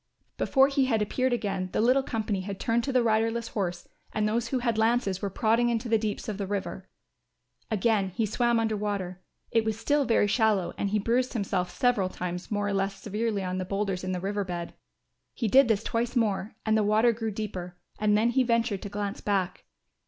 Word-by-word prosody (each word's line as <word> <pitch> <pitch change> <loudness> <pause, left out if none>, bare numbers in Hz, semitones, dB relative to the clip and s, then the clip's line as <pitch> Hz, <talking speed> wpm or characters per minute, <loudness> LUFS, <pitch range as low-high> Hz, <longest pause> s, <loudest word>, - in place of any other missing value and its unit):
Before 270 0 +4
he 275 -1 +2
had 230 -4 +1
appeared 255 +5 0
again 195 -6 -1
the - - 0
little 250 +5 +4
company 220 -6 -2
had 195 0 -6
turned 235 0 +1
to 275 - -1
the 255 -2 +3
riderless 225 +1 +1
horse 185 -4 -3 0.2
and 215 -1 0
those 230 +2 0
who 260 - -1
had 240 -2 0
lances 220 -4 +1
were 200 - -1
prodding 230 +4 +2
into 235 +1 -1
the 225 -1 +3
deeps 210 -1 -3
of 210 -2 -4
the 200 - -2
river. 200 0 -4 0.8
Again 215 -2 +1
he 220 +5 -1
swam 235 +2 +1
under 220 -1 0
water; 200 -3 -3 0.3
it 225 - +3
was 220 -1 -1
still 290 +3 +2
very 230 -3 +3
shallow 210 -3 +2
and 200 - -1
he 210 - +1
bruised 240 +5 +1
himself 185 -5 -1
several 215 -2 +1
times 180 -1 -5
more 205 -1 -1
or - - -1
less 195 0 0
severely 210 -1 -2
on 185 0 -2
the - - -1
boulders 195 -1 -2
in 185 - -2
the 180 - -2
river 200 +2 -2
bed. 175 -2 -5 0.6
He 235 - -1
did 265 +5 +6
this 220 -2 +1
twice 235 +2 -1
more 215 -3 0
and 220 0 +3
the 220 - +3
water 215 +3 +4
grew 225 0 -3
deeper; 190 -4 -5 0.2
and 210 0 +3
then 230 +3 +3
he 260 - +3
ventured 230 -4 +1
to 205 - -6
glance 205 0 -4
back. 190 -3 -1
215 Hz, 210 wpm, -28 LUFS, 195-235 Hz, 0.8 s, did